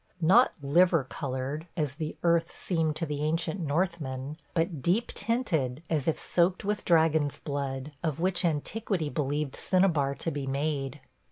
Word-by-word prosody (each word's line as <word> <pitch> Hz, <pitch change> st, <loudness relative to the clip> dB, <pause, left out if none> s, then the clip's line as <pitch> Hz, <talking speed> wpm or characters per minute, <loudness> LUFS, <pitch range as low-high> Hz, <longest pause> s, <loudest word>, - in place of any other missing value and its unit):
Not 190 Hz, +10 st, +5 dB
"liver 165 Hz, +2 st, +4 dB
colored," 135 Hz, +3 st, -4 dB
as 150 Hz, -4 st, 0 dB
the 155 Hz, +1 st, -5 dB
earth 170 Hz, 0 st, +2 dB
seemed 160 Hz, -4 st, 0 dB
to 165 Hz, -, -1 dB
the 150 Hz, -2 st, -3 dB
ancient 165 Hz, +3 st, 0 dB
Northmen, 150 Hz, -4 st, -2 dB, 0.2 s
but 165 Hz, -3 st, 0 dB
deep 190 Hz, -, +1 dB
tinted 165 Hz, -, 0 dB
as 150 Hz, -3 st, 0 dB
if 160 Hz, -, +1 dB
soaked 180 Hz, +2 st, +1 dB
with 210 Hz, 0 st, -1 dB
dragon's 160 Hz, -3 st, +3 dB
blood, 140 Hz, -1 st, -4 dB
of 155 Hz, -3 st, -2 dB
which 185 Hz, +2 st, +1 dB
antiquity 170 Hz, +1 st, -1 dB
believed 145 Hz, -2 st, -1 dB
cinnabar 165 Hz, -8 st, +2 dB
to 165 Hz, -, -2 dB
be 140 Hz, -2 st, -4 dB
made. 140 Hz, 0 st, -2 dB
155 Hz, 150 wpm, -29 LUFS, 140-175 Hz, 0.2 s, Not